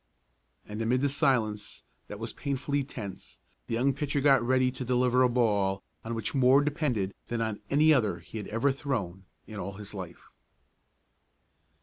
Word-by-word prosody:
And, 105 +1 -6
amid 125 +4 +1
a 140 - +3
silence 110 -7 0 0.2
that 105 - -7
was 115 +2 -5
painfully 140 0 -2
tense, 110 -7 -8 0.3
the 115 - -1
young 135 +4 +2
pitcher 145 +1 -1
got 135 -2 +5
ready 130 +1 +2
to 130 - -6
deliver 125 0 +2
a 125 - +5
ball 100 -5 +1 0.2
on 115 +1 -4
which 115 - -3
more 135 +1 +5
depended 140 - -1
than 120 - -2
on 110 -2 -2
any 155 +2 +5
other 115 -8 +2
he 110 - -8
had 105 - -6
ever 115 +6 +1
thrown 100 -10 -3 0.2
in 105 -2 -8
all 100 +1 -4
his 105 +1 -9
life. 90 -4 -8
120 Hz, 165 wpm, -29 LUFS, 105-135 Hz, 0.3 s, got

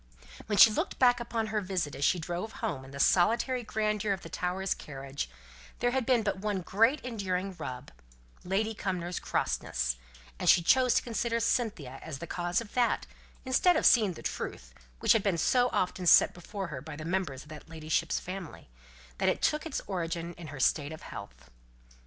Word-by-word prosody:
When 205 - 0
she 220 - +9
looked - - -2
back 245 -2 +5
upon 230 -2 -2
her 210 - +1
visit, 180 -6 -2
as 140 - -4
she 180 - +4
drove 175 +6 -4
home 135 -5 -3
in 135 - -12
the 140 +1 -9
solitary 230 - +3
grandeur 215 -2 0
of 190 - -6
the - - -8
Towers' 185 +2 -1
carriage, 135 - -6 0.5
there 245 - +1
had 260 -2 -1
been 245 -4 +3
but 200 -2 -1
one 205 -2 -1
great 225 - +3
enduring 195 -5 -3
rub 125 -5 -6 0.5
Lady 210 +4 0
Cumnor's 180 -4 -3
crossness - - -1 0.4
and - - +2
she 170 - +6
chose 255 +6 +4
to - - +3
consider 230 0 -1
Cynthia 210 - -1
as 155 -4 -6
the 170 - -7
cause 175 +3 -1
of 220 - -11
that, 245 -2 +1 0.4
instead 310 +7 +4
of - - 0
seeing 215 -6 +5
the - - -11
truth, - - -5 0.3
which - - +6
had 225 - +3
been 195 -4 +1
so 245 +8 +3
often 180 0 -1
set - - +7
before 190 +1 -6
her 140 -4 -6
by 155 +1 -8
the 155 +1 -7
members 170 -7 -2
of 155 - -15
her 155 - -7
ladyship's 160 +1 -1
family, 180 - -8 0.5
that - - +3
it - - 0
took 305 +2 +1
its 305 - -3
origin 170 -2 -3
in 170 -1 -10
her 145 -2 -8
state 145 +2 +2
of 160 - -9
health. 65 -11 -10
185 Hz, 195 wpm, -30 LUFS, 160-225 Hz, 0.5 s, she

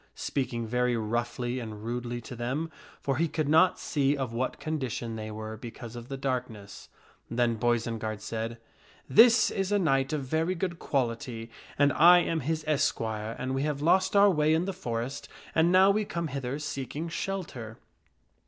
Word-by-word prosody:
speaking 120 -4 -2
very 125 +1 +1
roughly 120 +3 -2
and 110 -3 -7
rudely 120 +1 -3
to 120 +2 -9
them, 135 +8 -3 0.3
for 135 -2 -1
he 165 +2 +2
could 155 -2 -2
not 160 +5 +5
see 145 -2 0
of 130 -4 -3
what 125 +2 -2
condition 130 -7 -3
they 110 -1 -5
were 110 0 -6
because 115 0 -9
of 120 0 -8
the 135 - -4
darkness. 125 -7 -4 0.4
Then 120 0 +1
Boisenard 115 -2 -1
said, 115 +2 -4 0.3
" - - -28
This 230 +2 +6
is 195 0 -1
a 205 - +4
knight 135 -6 +2
of 150 -3 -1
very 160 +7 0
good 175 -1 -3
quality 115 -3 -2 0.3
and 145 0 +4
I 175 +3 +8
am 165 -2 +1
his 155 +2 -2
esquire, 110 -7 -1
and 130 +1 -3
we 135 - 0
have 145 -1 -1
lost 190 +4 +3
our 200 0 +7
way 155 -2 +3
in 165 +2 +1
the 195 - -3
forest 125 -6 -4 0.2
and 165 +2 +4
now 190 +2 +6
we 210 +2 +1
come 170 -5 -3
hither 135 -1 -3
seeking 150 +1 -4
shelter." 160 - -5
130 Hz, 175 wpm, -28 LUFS, 115-160 Hz, 0.4 s, I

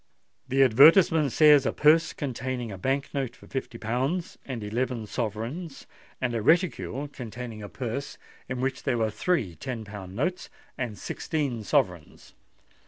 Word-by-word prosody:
The 135 +1 +4
advertisement 150 - +6
says 150 -1 +6
'_A - - -1
purse 155 +3 +5
containing 130 -4 -4
a 95 - -6
Bank 135 +6 -1
note 135 -4 -2
for - - -16
fifty 130 -3 -5
pounds 130 +11 -2
and 125 -5 -4
eleven 115 +2 -2
sovereigns, 120 - -4 0.3
and 125 -2 -1
a 115 - -1
reticule 155 - +1
containing 120 -4 -8
a 100 - -7
purse 130 +2 -5 0.3
in 125 -1 -3
which 135 0 -1
there 130 -4 0
were 110 -1 0
three 115 - 0
ten 115 +3 -6
pound 100 -2 -9
notes 175 - -2 0.3
and 120 -5 -4
sixteen 140 - -3
sovereigns. 90 -5 -1
130 Hz, 150 wpm, -27 LUFS, 110-140 Hz, 0.3 s, advertisement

